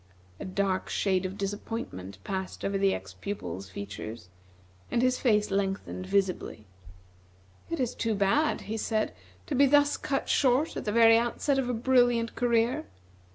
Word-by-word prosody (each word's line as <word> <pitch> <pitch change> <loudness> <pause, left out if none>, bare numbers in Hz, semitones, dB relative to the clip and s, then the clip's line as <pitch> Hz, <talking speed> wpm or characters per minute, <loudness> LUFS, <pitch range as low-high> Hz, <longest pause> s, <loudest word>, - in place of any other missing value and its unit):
A - - -6
dark 185 0 -1
shade 190 -2 +1
of 190 +2 -8
disappointment 195 - -5
passed 190 -1 -4
over 200 - -1
the 195 0 +3
ex 95 0 -5
pupil's 95 - -6
features, 100 +1 -7 0.6
and 235 - +1
his 255 0 +2
face 210 -5 +2
lengthened 195 -1 -2
visibly. 190 - -1 1.0
"It 335 - -3
is 250 -3 0
too 225 -2 -1
bad," 200 +11 +2
he 220 +2 -4
said, 215 - -1 0.3
"to - - -4
be 280 +2 +5
thus 290 +1 +4
cut 275 - -2
short 270 +3 +2
at - - -5
the 210 - 0
very 225 0 +6
outset 270 +4 0
of 250 -2 -1
a - - 0
brilliant 245 -1 +3
career. 235 0 +1
210 Hz, 155 wpm, -28 LUFS, 190-245 Hz, 1.0 s, very